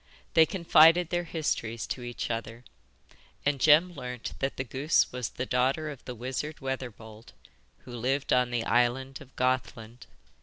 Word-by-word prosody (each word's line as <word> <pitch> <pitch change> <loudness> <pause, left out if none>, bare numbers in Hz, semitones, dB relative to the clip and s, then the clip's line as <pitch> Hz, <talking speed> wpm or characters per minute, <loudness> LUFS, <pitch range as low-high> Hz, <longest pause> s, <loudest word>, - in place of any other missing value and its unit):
They 160 -1 +6
confided 170 -2 +5
their 175 0 -1
histories 115 -9 -2
to 130 - -5
each 120 0 -4
other, 115 +1 -5 0.8
and 145 -1 +1
Jem 160 +6 +5
learnt 125 -5 -6
that 135 0 -2
the 130 - -1
goose 135 +5 +1
was 125 -3 -4
the 125 - -5
daughter 135 +5 0
of 140 - -11
the 125 - -6
wizard 130 +6 -4
Weatherbold, 120 -4 -7 0.5
who 125 -1 -8
lived 135 +4 0
on 125 -1 +3
the 120 -1 -1
island 130 +4 +1
of 135 -1 -15
Gothland. 125 -2 -2
130 Hz, 155 wpm, -28 LUFS, 120-150 Hz, 0.8 s, They